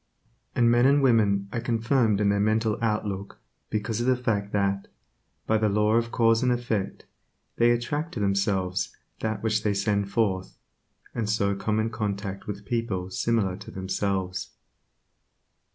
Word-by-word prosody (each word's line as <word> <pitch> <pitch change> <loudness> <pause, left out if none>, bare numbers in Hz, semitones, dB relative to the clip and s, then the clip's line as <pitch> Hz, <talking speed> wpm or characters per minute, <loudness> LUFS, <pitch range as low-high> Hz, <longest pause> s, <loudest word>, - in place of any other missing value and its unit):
And 120 -1 +4
men 120 +2 +5
and 140 0 +4
women 105 -6 +3
are 115 - -1
confirmed 115 -2 +2
in 105 -1 +3
their 100 0 +2
mental 110 +1 +2
outlook 105 -3 -2 0.3
because 110 +1 -2
of 120 - -1
the 130 - +4
fact 105 -5 -1
that, 100 -1 0 0.6
by 110 0 +2
the 110 -1 +2
law 105 +1 +2
of 115 0 +2
cause 115 -1 +3
and 125 -1 +2
effect, 115 -5 -2 0.5
they 120 0 +5
attract 145 +8 -1
to - - -3
themselves 100 -2 0 0.2
that 110 -1 -2
which 110 -1 +1
they 105 -2 0
send 100 0 0
forth, 100 -3 -1 0.6
and 110 -3 -2
so 100 -2 +1
come 105 +2 -1
in 110 +1 0
contact 100 -3 -4
with 105 -1 -6
people 100 -6 -2
similar 105 -2 0
to 105 - -10
themselves. 95 -1 -2
105 Hz, 155 wpm, -26 LUFS, 100-115 Hz, 0.6 s, men